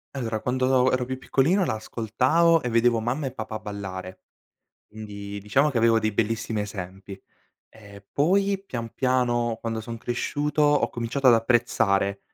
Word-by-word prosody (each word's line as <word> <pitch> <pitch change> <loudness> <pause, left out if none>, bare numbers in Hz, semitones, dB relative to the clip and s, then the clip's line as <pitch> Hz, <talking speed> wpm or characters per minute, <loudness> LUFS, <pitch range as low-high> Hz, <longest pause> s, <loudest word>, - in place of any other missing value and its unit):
Allora, 115 -4 -3
quando 130 0 +2
ero 130 -1 0
più 130 +1 -4
piccolino 165 +9 +2
la 110 - -1
ascoltavo 130 +10 +2
e - - -2
vedevo 115 0 +3
mamma 130 +5 -2
e - - -4
papà 110 0 -6
ballare, 95 -2 -7 0.7
quindi 100 -2 -8
diciamo 135 +9 +2
che 120 - -1
avevo 115 0 +4
dei 110 -1 -1
bellissimi 110 0 -1
esempi. 95 -1 -7 0.5
Ehm, 100 -2 -14
poi, 195 +6 +2
pian 115 - -6
piano, 120 -3 +1
quando 115 -1 -3
son 115 +1 -7
cresciuto, 145 +6 -2
ho 145 0 +3
cominciato 125 +3 -2
ad - - +8
apprezzare, 105 -4 +1
115 Hz, 150 wpm, -25 LUFS, 105-130 Hz, 0.7 s, ad